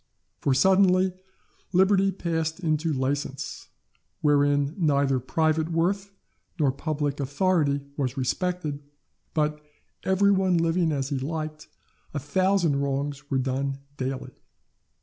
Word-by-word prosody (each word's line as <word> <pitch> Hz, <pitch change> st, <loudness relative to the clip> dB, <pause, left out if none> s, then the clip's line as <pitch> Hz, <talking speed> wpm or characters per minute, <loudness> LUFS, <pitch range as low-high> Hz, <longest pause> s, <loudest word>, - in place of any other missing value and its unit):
For, 135 Hz, -, +1 dB
suddenly, 185 Hz, +3 st, +4 dB, 0.6 s
liberty 195 Hz, +1 st, +4 dB
passed 165 Hz, -3 st, -2 dB
into 160 Hz, -2 st, 0 dB
license, 135 Hz, 0 st, -3 dB, 0.5 s
wherein 145 Hz, -1 st, +3 dB
neither 140 Hz, -6 st, +2 dB
private 155 Hz, +4 st, +1 dB
worth 195 Hz, +4 st, 0 dB, 0.5 s
nor 145 Hz, -3 st, +3 dB
public 145 Hz, 0 st, -2 dB
authority 145 Hz, 0 st, +1 dB, 0.2 s
was 135 Hz, -2 st, -2 dB
respected, 150 Hz, +2 st, -1 dB, 0.5 s
but, 150 Hz, -1 st, 0 dB, 0.4 s
every 195 Hz, +1 st, +3 dB
one 190 Hz, -2 st, +3 dB
living 165 Hz, 0 st, +2 dB
as 140 Hz, -2 st, -1 dB
he 140 Hz, -3 st, -1 dB
liked, 155 Hz, +2 st, -4 dB, 0.5 s
a -, -, 0 dB
thousand 175 Hz, +1 st, +2 dB
wrongs 140 Hz, +1 st, -2 dB
were 135 Hz, -, +1 dB
done 135 Hz, +1 st, -1 dB, 0.2 s
daily. 130 Hz, 0 st, -4 dB
150 Hz, 110 wpm, -26 LUFS, 140-180 Hz, 0.6 s, suddenly